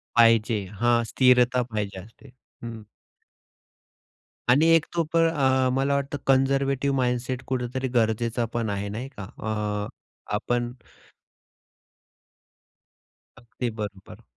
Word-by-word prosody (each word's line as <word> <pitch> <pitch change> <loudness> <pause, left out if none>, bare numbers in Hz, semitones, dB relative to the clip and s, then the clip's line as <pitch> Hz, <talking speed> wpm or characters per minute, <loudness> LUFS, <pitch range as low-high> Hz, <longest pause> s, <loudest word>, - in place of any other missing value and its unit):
पाहिजे. 115 -1 +5 0.2
हां, 120 0 +3
स्थिरता 125 -1 +4
पाहिजे 100 -3 -3
असते. 115 +6 -15 0.3
हं. 115 -2 -7 1.7
आणि 145 +6 +5
एक 160 - +2
तो 170 -1 +1
पण 165 0 +4
अ, 130 -4 +2
मला 135 +1 +1
वाटतं 140 +1 -2
कन्झर्व्हेटिव्ह 135 +1 +2
माइंडसेट 125 0 -1
कुठेतरी 130 0 -2
गरजेचा 115 +1 +1
पण 115 -2 -1
आहे 100 0 -3
नाही 115 +6 -5
का? 100 - -6
अ, 105 0 -3 0.5
आपण 120 +2 -1 2.7
अगदी 120 0 -5
बरोबर. 100 -2 -8
120 Hz, 105 wpm, -25 LUFS, 110-130 Hz, 2.7 s, पाहिजे